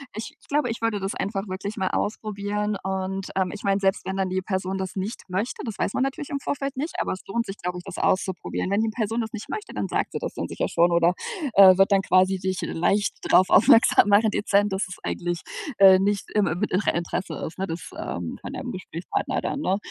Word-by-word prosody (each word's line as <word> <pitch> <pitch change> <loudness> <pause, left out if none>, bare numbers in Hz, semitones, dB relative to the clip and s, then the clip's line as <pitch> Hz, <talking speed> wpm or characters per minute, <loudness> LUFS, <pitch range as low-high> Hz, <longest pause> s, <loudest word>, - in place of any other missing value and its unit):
ich 225 +8 -6
glaube, 290 -3 +1
ich 230 0 -4
würde 225 -3 0
das 195 +1 -3
einfach 195 +1 -3
wirklich 195 +3 -5
mal 190 -2 0
ausprobieren 210 0 -2
und, 190 0 -3
ähm, 190 -1 +1
ich 205 - -8
meine, 195 0 +2
selbst 195 -1 0
wenn 190 +1 -3
dann 190 -1 0
die 190 +1 -1
Person 190 -1 -2
das 190 -1 -4
nicht 195 +4 -4
möchte, 195 +7 -2
das 225 -3 -5
weiß - - 0
man - - +1
natürlich 270 +2 -3
im 280 - -2
Vorfeld 275 0 -3
nicht, 300 +5 -3
aber - - -1
es 185 - -8
lohnt 230 +4 -1
sich, 195 +1 -7
glaube 180 0 -4
ich, 180 - -8
das 195 -1 -8
auszuprobieren. 185 -1 -1
Wenn 205 +2 +2
die 225 - +1
Person 225 +1 -1
das 220 0 -5
nicht 220 -1 -7
möchte, 430 -1 -5
dann - - -2
sagt - - -1
sie - - -3
das - - -4
dann - - -4
sicher - - -2
schon, 170 +1 +3
oder, 170 +1 +4 0.4
äh, 190 -2 +8
wird 195 +1 +4
dann 195 -1 +5
quasi 185 0 +3
dich 190 0 -2
leicht 200 +5 0 0.2
drauf 185 - +6
aufmerksam 215 +1 +6
machen, 210 +1 +5
dezent, 205 -1 +2
dass 190 0 -1
es 180 - -8
eigentlich, 175 -1 -3 0.4
äh, 190 -1 +8
nicht 200 0 0
im 210 -2 +3
in 175 +6 -2 0.2
ihrem - - +2
Interesse 175 +2 -3
ist, 160 - -8
ne, 190 - 0
das, 165 +1 -6
ähm, - - -4
von - - -7
deinem - - -5
Gesprächspartner - - -3
dann, 285 - -3
ne? 190 -6 +1
195 Hz, 235 wpm, -25 LUFS, 185-215 Hz, 0.4 s, äh